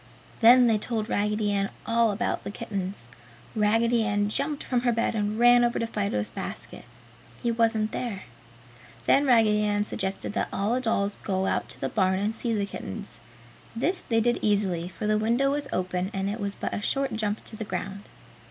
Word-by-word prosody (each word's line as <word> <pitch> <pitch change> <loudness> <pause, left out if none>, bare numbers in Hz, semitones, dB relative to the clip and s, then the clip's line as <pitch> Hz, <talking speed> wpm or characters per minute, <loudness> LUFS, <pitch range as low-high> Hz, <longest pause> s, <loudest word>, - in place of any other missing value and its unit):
Then 245 +2 +8
they 225 -3 +3
told 220 0 -3
Raggedy 210 0 0
Ann 195 -1 0 0.2
all 230 0 +3
about 220 +4 -2
the - - -5
kittens. 195 - -5 0.5
Raggedy 225 +2 +3
Ann 205 -1 +1
jumped 285 +6 -2
from 245 -2 0
her 245 -1 +2
bed 230 0 0
and 210 -1 -1
ran 240 +1 +6
over 240 0 +1
to 230 - 0
Fido's 200 - -2
basket; - - -7 0.6
he 235 - +2
wasn't 225 -2 +1
there. 220 -6 -4 0.8
Then 280 +1 +4
Raggedy 210 -3 +3
suggested 195 0 -3
that - - -1
all 205 +4 0
the 255 - 0
dolls 205 -4 0
go 190 -1 0
out - - -1
to - - -5
the - - -1
barn 190 -2 +1
and 210 +3 -1
see 235 +1 -2
the 205 -3 0
kittens. 200 +1 -7 0.6
This 345 +11 0
they 225 -1 +3
did 240 +1 +1
easily, 195 -5 +1
for 185 - -6
the 215 0 +2
window 240 +5 +2
was 290 0 -2
open 185 0 -1
and 195 +1 -1
it 220 - -5
was 200 -1 -2
but - - -4
a - - -2
short 275 +5 0
jump 215 -1 -2
to - - -8
the 220 - -5
ground. 200 -1 -5
215 Hz, 190 wpm, -26 LUFS, 200-235 Hz, 0.8 s, Then